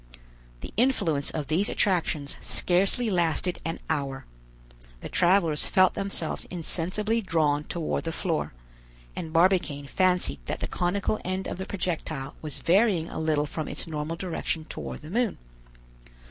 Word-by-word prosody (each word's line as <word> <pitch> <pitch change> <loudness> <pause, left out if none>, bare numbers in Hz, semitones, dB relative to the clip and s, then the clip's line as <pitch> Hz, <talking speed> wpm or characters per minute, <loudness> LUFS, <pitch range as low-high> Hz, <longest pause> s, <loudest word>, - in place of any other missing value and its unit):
The - - -8
influence 170 - +2
of 150 -2 -3
these 165 +8 +2
attractions 160 -7 +1
scarcely 195 +6 +2
lasted 175 0 +1
an 165 0 -2
hour; 140 -4 -2 0.8
the - - -6
travelers 175 -4 +3
felt 185 0 +5
themselves 195 -5 -2
insensibly 185 +6 -1
drawn 155 -6 +1
toward 170 -1 -2
the 165 - -1
floor, 165 -1 -1 0.6
and 160 - -5
Barbicane 165 -4 +3
fancied 180 - +2
that - - -2
the - - -2
conical 195 +4 0
end 185 +1 -2
of - - -4
the 190 - -4
projectile 160 -7 -3
was 150 -3 -3
varying 180 -2 +3
a - - -5
little 155 -2 +1
from 155 +1 -4
its - - -2
normal 155 0 -3
direction 165 -2 -3
toward - - -6
the 155 - -9
moon. 235 0 +1
170 Hz, 145 wpm, -27 LUFS, 155-190 Hz, 0.8 s, felt